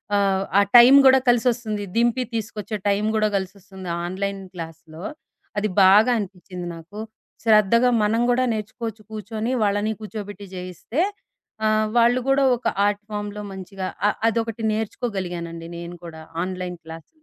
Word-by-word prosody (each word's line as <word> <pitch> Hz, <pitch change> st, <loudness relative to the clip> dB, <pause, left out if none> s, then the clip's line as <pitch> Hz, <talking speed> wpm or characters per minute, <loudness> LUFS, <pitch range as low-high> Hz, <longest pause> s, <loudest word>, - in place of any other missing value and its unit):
ఆహ్, 195 Hz, -1 st, +2 dB
ఆ -, -, +8 dB, 0.2 s
టైము 250 Hz, +4 st, +10 dB
గూడా 265 Hz, 0 st, +7 dB
కలిసొస్తుంది. 235 Hz, -3 st, +1 dB
దింపి 240 Hz, +2 st, +2 dB
తీసుకొచ్చే 215 Hz, -1 st, -4 dB
టైం 205 Hz, +1 st, +2 dB
గూడా 215 Hz, 0 st, +3 dB
కలిసొస్తుంది 190 Hz, -1 st, -7 dB, 0.2 s
ఆన్‌లైన్ 195 Hz, +2 st, -3 dB
క్లాస్‌లో. 165 Hz, -1 st, -9 dB, 0.5 s
అది 210 Hz, +1 st, +1 dB
బాగా 205 Hz, +6 st, +6 dB
అనిపిచింది 180 Hz, -2 st, -7 dB
నాకు. 165 Hz, +6 st, -11 dB, 0.4 s
శ్రద్ధగా 225 Hz, +2 st, +5 dB
మనం 220 Hz, +2 st, +2 dB
గూడా 245 Hz, +1 st, +3 dB
నేర్చుకోవచ్చు 220 Hz, +1 st, -5 dB
కూర్చొని. 220 Hz, +2 st, -4 dB
వాళ్ళని 205 Hz, +1 st, +1 dB
కూర్చోబెట్టి 205 Hz, -2 st, -7 dB
జేయిస్తే 185 Hz, -, -4 dB, 0.6 s
ఆహ్, 215 Hz, 0 st, +2 dB
వాళ్ళు 240 Hz, +2 st, +4 dB
గూడా 270 Hz, 0 st, +3 dB
ఒక 245 Hz, -, -3 dB, 0.2 s
ఆర్ట్ 205 Hz, 0 st, 0 dB
ఫార్మ్‌లో 205 Hz, 0 st, -4 dB
మంచిగా 190 Hz, 0 st, -6 dB, 0.2 s
అ -, -, +5 dB, 0.2 s
అదొకటి 225 Hz, 0 st, -2 dB
నేర్చుకోగలిగానండి, 180 Hz, -7 st, -4 dB
నేను 170 Hz, +1 st, -7 dB
కూడా 160 Hz, -1 st, -9 dB, 0.2 s
ఆన్‌లైన్ 180 Hz, -1 st, -5 dB
క్లాస్ 160 Hz, 0 st, -10 dB
205 Hz, 130 wpm, -23 LUFS, 185-225 Hz, 0.6 s, టైము